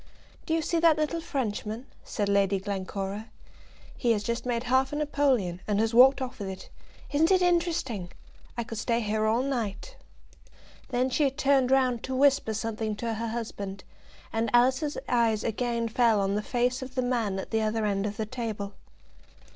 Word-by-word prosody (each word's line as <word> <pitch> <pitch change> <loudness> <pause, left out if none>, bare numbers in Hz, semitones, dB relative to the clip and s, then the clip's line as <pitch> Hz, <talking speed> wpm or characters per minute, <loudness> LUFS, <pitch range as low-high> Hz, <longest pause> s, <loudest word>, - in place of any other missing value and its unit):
"Do 320 - +1
you 325 - 0
see 335 +2 0
that 325 -2 +5
little 310 +2 -1
Frenchman?" 225 -4 -3 0.2
said 205 -2 -2
Lady 200 -1 +2
Glencora. 195 +1 -4 0.7
"He 235 -3 +2
has 210 -1 -2
just 235 +3 -3
made 235 -1 0
half 260 +2 +2
a - - -3
napoleon, 270 -12 +1
and 205 -1 +1
has 225 +1 +1
walked 265 +3 +7
off 255 -2 -7
with 200 - -4
it. 190 -1 -9 0.4
Isn't 315 +3 +3
it 370 -1 +4
interesting? 325 - 0 0.5
I 235 - 0
could 225 -1 -6
stay 235 0 0
here 215 0 0
all 230 +4 +2
the - - -2
night." 240 - -4 0.9
Then 255 0 0
she 285 +2 +3
turned 270 -2 +2
round 255 -3 +3
to 260 - -3
whisper 270 -5 +3
something 220 -1 -2
to 230 +2 -3
her 230 +1 -3
husband, 205 -4 -5 0.5
and 225 0 0
Alice's 260 +5 +3
eyes 230 -3 +2
again 235 +1 -1
fell 230 -1 +3
on 195 0 +1
the 210 - 0
face 245 +3 0
of 260 0 -8
the 255 - +1
man 230 -6 0
at 190 - -6
the 225 -1 +1
other 220 0 0
end 200 0 0
of 205 0 -6
the 220 - -1
table. 215 -4 -4
235 Hz, 185 wpm, -28 LUFS, 210-260 Hz, 0.9 s, walked